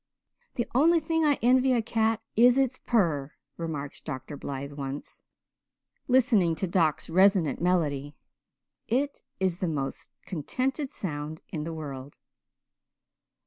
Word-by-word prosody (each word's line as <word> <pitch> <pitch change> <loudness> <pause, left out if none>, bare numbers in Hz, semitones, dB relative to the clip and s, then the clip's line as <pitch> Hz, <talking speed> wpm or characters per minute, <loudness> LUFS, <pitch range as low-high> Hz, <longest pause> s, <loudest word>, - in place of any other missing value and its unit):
"The 240 - -1
only 330 +7 +5
thing 325 +1 0
I 290 -2 +3
envy 255 +2 +4
a 240 - +2
cat 225 0 0
is 245 +3 +6
its 265 -1 +1
purr," 160 - +1 0.2
remarked 150 -4 -5
Dr. 130 -1 -6
Blythe 140 0 -5
once, 140 0 -6 0.9
listening 225 - +4
to 175 - -2
Doc's 165 -4 +1
resonant 180 -4 +3
melody. 150 -5 0 0.7
"It 275 +5 0 0.2
is 185 -2 0
the 185 - 0
most 140 -4 -3 0.2
contented 260 - -2
sound 155 - -5
in 150 -1 -4
the 165 - -4
world." 140 -3 -7
175 Hz, 125 wpm, -28 LUFS, 145-245 Hz, 0.9 s, is